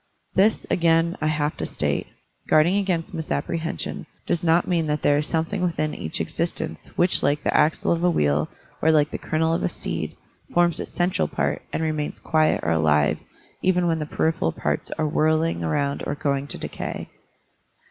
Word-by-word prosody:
This, 210 +3 +3
again, 165 0 +3
I 155 - +1
have 150 -1 0
to - - -2
state, - - -1 0.4
guarding 155 +5 +4
against 190 -1 -1
misapprehension, 160 - -3 0.2
does 170 - -1
not 170 +1 +3
mean 170 -3 +1
that 150 0 -1
there 145 0 +4
is 150 - -2
something 165 +4 -1
within 165 -4 0
each 80 - -4
existence - - -3
which 175 +1 +3
like 145 +1 +1
the - - 0
axle 155 - +3
of 170 0 +1
a 180 - +5
wheel 75 - +1 0.3
or 160 - +3
like 150 -1 +3
the - - -4
kernel 160 +1 0
of 165 - 0
a - - +1
seed 80 - -4 0.4
forms 175 -1 +3
its - - -5
central 175 - +1
part - - -1
and 160 - -1
remains 155 -2 -2
quiet 155 -1 +2
or 85 - +1
alive 75 -2 +3 0.4
even 180 -1 +2
when 165 -1 +1
the 150 - -3
peripheral 160 - 0
parts 75 -2 -2
are 155 -1 +1
whirling 155 - +1
around 140 - 0
or - - -1
going 140 -1 -1
to - - -4
decay. - - -5
155 Hz, 180 wpm, -24 LUFS, 145-170 Hz, 0.4 s, a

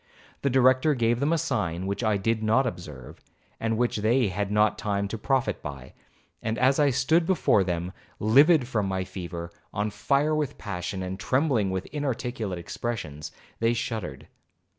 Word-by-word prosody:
The 140 - +1
Director 130 +3 +4
gave 120 -1 +1
them 145 +4 +1
a 165 - +3
sign 95 - -1
which 100 +4 -2
I 110 -2 +2
did 110 +3 0
not 110 +5 +3
observe, 75 - -7 0.4
and 115 0 0
which 120 -1 +1
they 110 +2 +2
had 100 +2 -2
not 105 0 +3
time 100 -1 -1
to 115 - -3
profit 130 +3 0
by,—and 70 - -8
as 130 +3 +3
I 145 -1 +5
stood 160 +6 +2
before 170 - +3
them 90 0 -3 0.2
livid 140 +6 +5
from 105 -6 0
my 95 -1 -1
fever, 85 -2 -7 0.2
on 105 +1 -2
fire 140 +8 +1
with 150 -3 -1
passion, 95 -1 -4
and 95 +1 -5
trembling 130 -3 +1
with 95 0 -2
inarticulate 120 -8 -3
expressions, 85 -5 -5 0.3
they 115 +1 +2
shuddered. 110 -4 -4
110 Hz, 160 wpm, -26 LUFS, 95-130 Hz, 0.4 s, I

